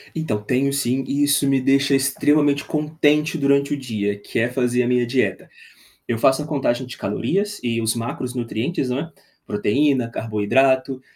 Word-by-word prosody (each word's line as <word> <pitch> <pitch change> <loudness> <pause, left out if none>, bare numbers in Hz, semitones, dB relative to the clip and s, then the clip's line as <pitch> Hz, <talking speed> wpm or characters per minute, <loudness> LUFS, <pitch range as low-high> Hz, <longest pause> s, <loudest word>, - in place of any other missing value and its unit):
Então, 125 -10 -2
tenho 130 +6 0
sim, 135 -1 0
e 145 +1 0
isso 145 -1 +2
me 135 -1 +2
deixa 135 +1 +3
extremamente 140 +1 +2
contente 150 0 +1
durante 140 0 +2
o - - -2
dia, 105 -6 -3
que 100 - -4
é 115 +2 +1
fazer 125 -1 0
a - - -1
minha 125 0 +2
dieta. 125 +2 -1 0.6
Eu 115 - -1
faço 135 +5 +3
a 150 - -6
contagem 135 -4 -1
de 125 - -9
calorias 195 - -2
e 115 -1 -1
os 115 +1 0
macronutrientes, 125 +4 -3
não 125 +2 -1
é, 165 +3 -6 0.3
proteína, 125 +4 +1
carboidrato, 130 +5 +1
135 Hz, 165 wpm, -21 LUFS, 120-145 Hz, 0.6 s, deixa